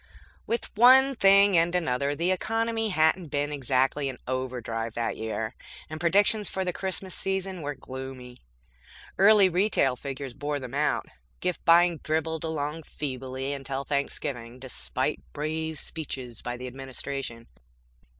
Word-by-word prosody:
With 235 - -2
one 260 +4 +7
thing 200 -3 +6
and 170 +1 +3
another, 140 -4 0
the 170 +4 +1
economy 225 +3 0
hadn't 160 0 +2
been 145 0 -1
exactly 135 +1 +1
in 130 - -7
overdrive 120 -3 -3
that 115 -1 -1
year, 110 +1 -3 0.4
and 155 - -5
predictions 205 +4 +3
for 190 0 -2
the 180 - -1
Christmas 190 0 -1
season 190 -2 -1
were 145 0 -4
gloomy. 130 -2 -9 0.8
Early 200 0 +7
retail 180 -8 +2
figures 135 0 -6
bore 145 +2 -3
them 130 -2 -8
out. - - +1 0.3
Gift 180 - -2
buying 170 -1 +5
dribbled 160 +2 -1
along 160 0 -3
feebly 135 -2 -5
until 135 0 -4
Thanksgiving, 130 -4 -3
despite 130 0 -3
brave 160 +1 -3
speeches 130 -7 -5
by 120 0 -4
the 125 - -7
Administration. 130 -2 -5
145 Hz, 135 wpm, -27 LUFS, 130-180 Hz, 0.8 s, one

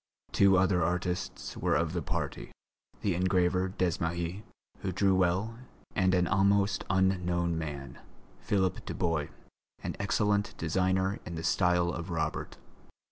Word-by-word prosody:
Two 100 -1 +5
other 90 -2 +3
artists 90 +1 -2
were - - +1
of 80 +1 0
the 90 - -1
party, - - -4 0.5
the 100 - +1
engraver 90 +1 +2
Desmahis, 85 0 -1 0.4
who 95 - -2
drew 95 +2 +2
well, 95 +5 +1 0.4
and 95 -1 +3
an 90 -1 +3
almost 100 +3 +2
unknown 90 -3 +1
man, 75 -4 -5 0.4
Philippe 95 -3 0
Dubois, 85 -6 -1 0.6
an - - -3
excellent 105 -1 +1
designer 95 +4 +1
in 85 - -6
the 80 - -5
style 90 0 +2
of 85 +1 -5
Robert. 80 -2 -3
90 Hz, 130 wpm, -30 LUFS, 85-95 Hz, 0.6 s, Two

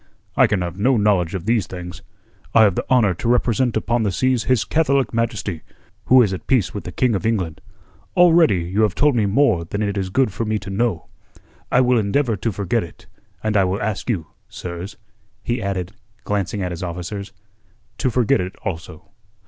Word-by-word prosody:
"I - - +5
can 105 -3 0
have 90 +2 -6
no 125 +4 +3
knowledge 100 -4 +2
of 90 -2 -5
these 110 -5 +1
things. 90 -2 -8 0.5
I 115 - +8
have 100 -3 +4
the - - -4
honour 120 -7 +4
to 90 - -5
represent 120 -1 +2
upon 120 +2 0
the 105 -3 0
seas 130 +3 +1
His 130 -3 +2
Catholic 140 -5 +1
Majesty, 110 -7 -2 0.4
who 130 0 +6
is 100 -4 0
at 95 - -7
peace 125 -8 +2
with 105 - -6
the - - -5
King 125 -3 +1
of 100 - -2
England. 95 -9 -1 0.6
Already 165 - +5
you 95 +5 -1
have 105 -3 +2
told 145 -2 +3
me 110 -4 +2
more 100 -5 +2
than 100 +6 -3
it 100 -1 -1
is 95 -1 -3
good 125 0 +1
for 115 - -2
me 110 -1 -1
to 100 -2 -7
know. 100 -6 -1 0.7
I 125 - +5
will 125 -1 +3
endeavour 115 +3 +1
to 110 +3 -2
forget 100 +3 -1
it, 85 - -13 0.4
and 110 -1 0
I 100 - +5
will 95 +2 -1
ask 105 +3 -3
you, 95 -9 -1 0.2
sirs," 90 +4 -7 0.5
he 120 0 -2
added, 95 -2 -3 0.3
glancing 100 0 -2
at 90 - -3
his 85 - -6
officers, 90 +3 -5 0.7
"to 130 - +1
forget 125 -1 +2
it 90 +1 -5
also." 85 -3 -6
105 Hz, 200 wpm, -21 LUFS, 95-120 Hz, 0.7 s, I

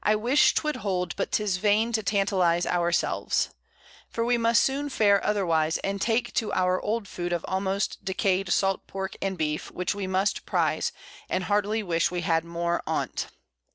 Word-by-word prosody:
I 210 - +3
wish 245 +7 +3
'twould 305 -1 0
hold, 180 -4 -2
but - - -3
'tis 205 -4 +1
in - - -12
vain 215 +2 +3
to 220 -1 +1
tantalize 185 -3 +1
our 175 -1 +1
selves; - - 0 0.6
for 230 - -2
we 245 +1 +3
must 230 0 +3
soon 280 +2 -1
fare 205 -6 +3
otherwise, 165 -6 +1
and 195 0 -2
take 235 0 0
to 215 -2 0
our 185 0 +1
old 215 0 -2
Food 175 -1 -4
of 175 -1 -1
almost 190 +1 -1
decay'd 190 -1 0
Salt 195 +1 +1
Pork 190 0 -5
and 190 -1 -2
Beef, 150 -1 -2
which 180 +2 -2
we 200 -2 -4
must 190 +2 0
prize, - - +1 0.4
and 185 - 0
heartily 210 +3 0
wish 170 -3 +1
we 175 0 -3
had 165 -1 +1
more 170 0 -2
on't. - - -2
195 Hz, 185 wpm, -26 LUFS, 175-215 Hz, 0.6 s, I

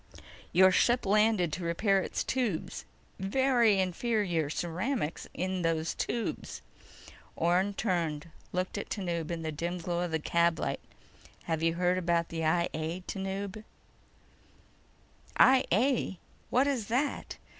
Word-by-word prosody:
Your 185 +2 +6
ship 240 +6 +3
landed 210 -4 +3
to 185 - -3
repair 195 +4 +2
its - - -2
tubes. 235 -11 -2 0.3
Very 235 +1 +3
inferior 185 -4 0
ceramics 175 - -2
in 185 +1 -2
those 165 -1 0
tubes." 235 -2 -3 0.7
Orne 180 +4 +1
turned, 165 -7 -1 0.2
looked 185 +2 -2
at - - -6
Tanub 170 -5 -3
in 170 -1 -3
the 160 - -2
dim 170 +4 -3
glow 175 0 -2
of 175 - -1
the 160 - 0
cab 170 +1 +2
light. - - -2 0.6
"Have 160 -1 -2
you 165 0 +2
heard 180 +1 +2
about 170 -1 +1
the 165 -1 -3
I 170 +2 +2
A, 160 +3 -3
Tanub?" 195 +2 -4 1.7
"I 260 0 +6
A? 230 -1 +2 0.3
What 255 +3 +3
is 260 -7 -1
that?" 260 +5 -1
180 Hz, 135 wpm, -30 LUFS, 170-210 Hz, 1.7 s, Your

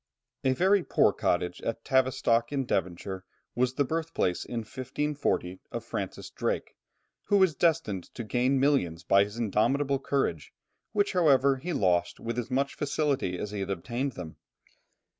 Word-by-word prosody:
A 130 - +3
very 190 +5 +3
poor - - +3
cottage 90 0 -1
at 115 - -4
Tavistock 125 -3 +2
in 135 -2 -1
Devonshire 95 -1 -2 0.3
was 125 +1 0
the 140 - +3
birthplace 160 - -1
in 120 -1 -4
1540, 130 -5 -2
of - - -5
Francis - - -5
Drake, - - -2 0.5
who 205 - +3
was 190 -4 +4
destined 135 - +1
to 120 - -4
gain 125 +4 +1
millions 90 - +1
by 100 +1 +5
his 105 +2 -9
indomitable 130 +6 +1
courage, 110 - -1 0.4
which 205 -1 +1
however, 140 -6 +4
he 170 +7 -4
lost 90 - +1
with 115 +1 -3
as 120 - -4
much 140 +2 0
facility 140 - -1
as 105 +3 -4
he 105 - -4
had 95 0 -3
obtained 120 +8 -2
them. 85 -5 -8
125 Hz, 155 wpm, -28 LUFS, 100-140 Hz, 0.5 s, by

